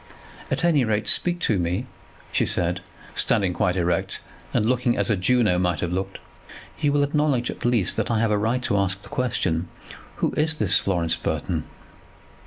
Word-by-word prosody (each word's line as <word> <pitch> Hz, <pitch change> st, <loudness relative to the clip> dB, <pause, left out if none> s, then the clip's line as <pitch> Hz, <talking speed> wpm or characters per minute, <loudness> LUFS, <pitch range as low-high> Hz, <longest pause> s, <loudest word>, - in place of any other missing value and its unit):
"At -, -, -1 dB
any 160 Hz, -6 st, +4 dB
rate 105 Hz, -2 st, 0 dB
speak 175 Hz, -1 st, +3 dB
to 105 Hz, -, +2 dB
me," 90 Hz, +7 st, -1 dB, 0.5 s
she -, -, +1 dB
said, 90 Hz, +1 st, -1 dB, 0.3 s
standing 95 Hz, -4 st, +2 dB
quite 90 Hz, +1 st, +1 dB
erect, 85 Hz, -2 st, 0 dB, 0.3 s
and 105 Hz, -, +1 dB
looking 125 Hz, 0 st, +1 dB
as -, -, +1 dB
a -, -, +3 dB
Juno 100 Hz, -1 st, +2 dB
might 90 Hz, -2 st, 0 dB
have 85 Hz, -, -2 dB
looked. 95 Hz, +1 st, -3 dB, 0.6 s
"You 145 Hz, -2 st, +2 dB
will 145 Hz, 0 st, +3 dB
acknowledge 145 Hz, -4 st, +1 dB
at -, -, -10 dB
least 115 Hz, -7 st, +1 dB
that -, -, -1 dB
I 115 Hz, -, +1 dB
have 115 Hz, -1 st, +2 dB
a 105 Hz, -, +3 dB
right 115 Hz, +4 st, 0 dB
to 100 Hz, -, +1 dB
ask 95 Hz, 0 st, -1 dB
the -, -, -12 dB
question. 90 Hz, -9 st, -1 dB, 0.5 s
Who -, -, 0 dB
is 160 Hz, +1 st, +1 dB
this 105 Hz, -, +3 dB
Florence 85 Hz, -4 st, +1 dB
Burton?" 80 Hz, 0 st, -2 dB
105 Hz, 185 wpm, -24 LUFS, 90-125 Hz, 0.6 s, any